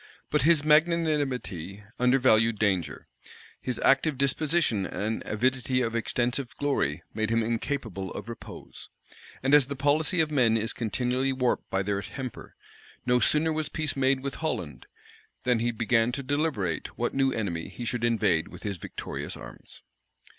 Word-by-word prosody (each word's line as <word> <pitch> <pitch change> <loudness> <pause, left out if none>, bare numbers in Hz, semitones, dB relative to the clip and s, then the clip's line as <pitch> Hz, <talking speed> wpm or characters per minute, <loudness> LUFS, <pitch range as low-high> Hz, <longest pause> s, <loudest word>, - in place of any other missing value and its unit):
But - - +3
his 155 +1 +4
magnanimity 150 - +1 0.2
undervalued 125 -3 +4
danger; 95 -5 -1 0.5
his 125 - -2
active 135 +1 +4
disposition 140 - +2
and 110 +2 -3
avidity 130 +3 +1
of 115 0 -2
extensive 120 +3 -1
glory 135 - 0
made 110 0 -1
him 115 0 +2
incapable 115 -4 -3
of - - -7
repose: 115 - -10 0.5
and 135 +2 +2
as 145 -4 +7
the 140 - -4
policy 150 +5 +2
of 155 -1 +2
men 120 -6 +3
is 110 +1 -1
continually 125 +3 0
warped 125 -2 0
by 95 +1 0
their 100 0 -1
temper, 130 +4 -7 0.5
no 125 0 +3
sooner 155 +7 +2
was 155 0 -2
peace 155 -1 -2
made 135 0 +2
with 140 0 -4
Holland, 90 - -3 0.6
than 125 -2 +2
he 120 +1 +1
began 115 +1 +2
to 140 - -3
deliberate 135 - -1
what - - -1
new 135 -1 +2
enemy 85 -9 -3
he 120 - -7
should 120 0 -2
invade 100 -8 +2
with 90 - -12
his 100 -3 -3
victorious - - -6
arms. - - -11
125 Hz, 155 wpm, -27 LUFS, 110-140 Hz, 0.6 s, as